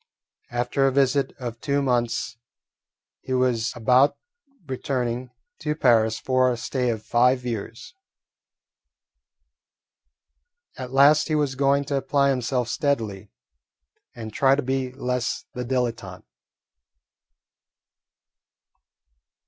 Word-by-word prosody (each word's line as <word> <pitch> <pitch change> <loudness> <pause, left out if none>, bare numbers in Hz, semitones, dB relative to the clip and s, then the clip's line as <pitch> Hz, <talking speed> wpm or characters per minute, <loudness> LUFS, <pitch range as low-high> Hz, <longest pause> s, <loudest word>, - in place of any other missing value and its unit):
After 125 +3 0
a - - +2
visit 135 0 +2
of 120 -3 -7
two 140 -1 0
months 125 -3 -1 0.8
he 130 - -5
was 125 -3 +1
about 125 +4 +3 0.5
returning 130 -2 -3 0.3
to 150 - -2
Paris 115 -6 +3
for 130 -1 +2
a 120 - -3
stay 125 +1 -2
of 110 -2 -3
five 125 +1 +2
years. 115 +1 -6 2.8
At 130 -2 -7
last 140 +3 +5
he 155 - 0
was 145 -3 0
going 140 +1 +1
to 140 0 -1
apply 140 0 +2
himself 125 -1 -1
steadily 110 -7 -2 0.9
and 110 -3 -8
try 135 0 +4
to 145 - -2
be 130 0 -2
less 125 -2 -3
the 125 - -4
dilettante. 120 -7 -3
125 Hz, 105 wpm, -24 LUFS, 120-135 Hz, 2.8 s, last